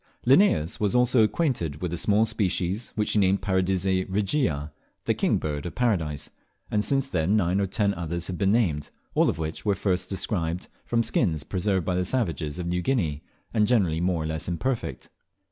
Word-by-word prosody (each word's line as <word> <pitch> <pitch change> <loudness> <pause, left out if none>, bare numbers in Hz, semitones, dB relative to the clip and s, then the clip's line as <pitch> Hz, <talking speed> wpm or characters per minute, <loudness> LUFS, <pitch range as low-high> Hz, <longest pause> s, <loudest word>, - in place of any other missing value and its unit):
Linnaeus 120 - +4
was 105 +2 +1
also 125 -1 +4
acquainted 110 - 0
with 90 -1 -2
a - - 0
small 105 +5 +3
species, 100 -1 -1
which 105 -1 0
he 105 - +2
named 95 0 +2
Paradisea 95 -1 +1
regia 95 - 0 0.3
(the - - +2
King - - +1
Bird 75 +1 -3
of - - -8
Paradise), 85 - -1 0.4
and 105 -1 +1
since 135 +1 +1
then 90 -4 +1
nine 95 0 +1
or 100 - 0
ten 100 +1 +1
others 85 0 -3
have 90 -2 -4
been 95 0 +3
named, 90 -11 +1 0.2
all - - +3
of - - -2
which 80 0 -4
were 100 -2 +2
first 90 -2 -1
described 90 -3 -2 0.2
from 115 -1 +2
skins 80 -11 +1
preserved 95 -2 -1
by 90 - 0
the 90 0 +1
savages 85 - -1
of 90 - -4
New 90 +1 -1
Guinea, 85 - 0 0.3
and 105 -2 +3
generally 90 -10 +2
more 90 -3 0
or - - -3
less 80 0 -3
imperfect. 115 +8 -3
95 Hz, 190 wpm, -26 LUFS, 85-110 Hz, 0.4 s, Linnaeus